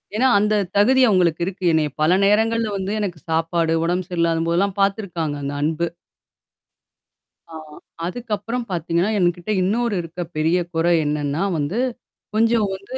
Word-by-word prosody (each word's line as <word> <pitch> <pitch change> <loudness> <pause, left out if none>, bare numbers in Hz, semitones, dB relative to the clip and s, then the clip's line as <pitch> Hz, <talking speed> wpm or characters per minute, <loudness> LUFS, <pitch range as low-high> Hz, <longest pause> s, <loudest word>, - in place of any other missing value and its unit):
ஏன்னா, 255 +4 +3
அந்த 210 +1 +2 0.2
தகுதி 260 +6 +4
அவுங்களுக்கு 175 -5 +2
இருக்கு. 190 0 -6
என்னைய 155 -2 +2
பல 155 +2 +4
நேரங்கள்ல 220 +2 +2
வந்து 190 +1 -3
எனக்கு 180 -6 -3
சாப்பாடு 165 0 +1
உடம்பு 175 +1 0
சரியில்லாதம்போதெல்லாம் 170 +3 0
பாத்துருக்காங்க, 180 -7 -1
அந்த 140 +1 -3
அன்பு. 160 +3 0 1.6
ஆ 165 - -14 0.5
அதுக்கப்புறம் 230 +3 -4
பாத்தீங்கன்னா, 170 +3 0
என்கிட்ட 175 +1 0
இன்னொரு 225 +2 0
இருக்க 170 +1 -7 0.2
பெரிய 160 +3 +2 0.2
குறை 165 +2 +2
என்னான்னா 150 +2 -1
வந்து, 155 +10 -2 0.6
கொஞ்சம் 225 0 +3
வந்து 200 +7 -8
180 Hz, 130 wpm, -21 LUFS, 165-210 Hz, 1.6 s, தகுதி